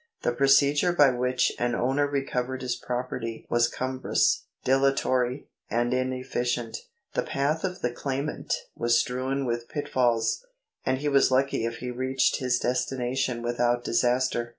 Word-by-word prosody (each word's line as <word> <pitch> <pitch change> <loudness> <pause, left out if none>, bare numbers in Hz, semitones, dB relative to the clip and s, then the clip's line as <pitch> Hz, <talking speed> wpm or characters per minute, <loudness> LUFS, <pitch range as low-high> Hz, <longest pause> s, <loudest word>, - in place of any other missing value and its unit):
The - - +2
procedure 140 +5 +4
by 145 -5 +6
which 125 0 +1
an 120 0 0
owner 135 +4 +1
recovered 130 -2 -2
his 125 -1 -1
property 125 -2 -4
was 120 0 +4
cumbrous, 130 +1 0 0.2
dilatory, 130 -1 +1 0.2
and 120 +1 +1
inefficient. 125 -2 -2 0.4
The - - +1
path 145 +4 -1
of 185 -1 -3
the 125 - +1
claimant 135 +4 -4 0.2
was 120 0 +3
strewn 130 +3 -1
with 120 -1 -3
pit 145 - -4
falls, 120 - +1 0.4
and 130 - +1
he 145 +2 -3
was 140 -1 +4
lucky 130 -3 +1
if 115 0 -3
he 125 +1 -5
reached 130 +1 +1
his 125 -1 +1
destination 125 0 -1
without 120 0 +1
disaster. 120 0 +1
125 Hz, 145 wpm, -27 LUFS, 120-135 Hz, 0.4 s, by